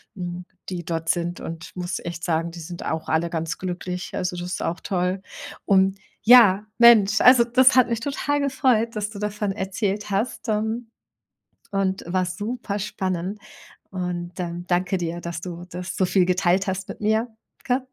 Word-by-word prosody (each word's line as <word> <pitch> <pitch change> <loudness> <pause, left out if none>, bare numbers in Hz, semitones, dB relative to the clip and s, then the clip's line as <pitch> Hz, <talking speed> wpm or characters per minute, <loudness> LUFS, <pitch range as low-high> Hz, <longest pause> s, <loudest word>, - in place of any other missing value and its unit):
mhm, 175 -1 -5 0.2
die 175 -2 -4
dort 165 0 -3
sind 175 0 0
und 165 +1 -8
muss 180 0 -3
echt 170 -1 -6
sagen, 165 0 0
die 170 - -9
sind 170 +2 -7
auch 160 0 -3
alle 165 +2 +1
ganz 165 0 -3
glücklich. 180 0 -5
Also, 180 0 -2
das 175 0 -5
ist - - -3
auch 170 +2 -2
toll. 185 0 -1 0.4
Und 195 0 +3 0.2
ja, 215 -4 +7
Mensch, 220 -3 +7
also 250 -2 +7
das 255 +2 +5
hat 250 - +6
mich 230 -1 -1
total 290 +1 -1
gefreut, 255 -5 +1
dass 210 0 -2
du 215 - -10
davon 210 -1 -2
erzählt 200 +2 -2
hast. 225 +3 -2
Ähm, 220 +2 -1 0.8
und 195 -1 0
war 185 +1 +1
super 205 +2 -4
spannend 190 0 -3 0.5
und, 180 -2 -4
ähm, 175 0 -4
danke 180 +1 +1
dir, 170 0 -3
dass 170 -1 -5
du 175 -1 -7
das 180 +1 -6
so 185 - +3
viel 180 0 +3
geteilt 185 +1 +2
hast 190 0 -2
mit - - -8
mir, 220 +3 +2 0.4
gell? 255 +1 +1
190 Hz, 175 wpm, -24 LUFS, 175-215 Hz, 0.8 s, ja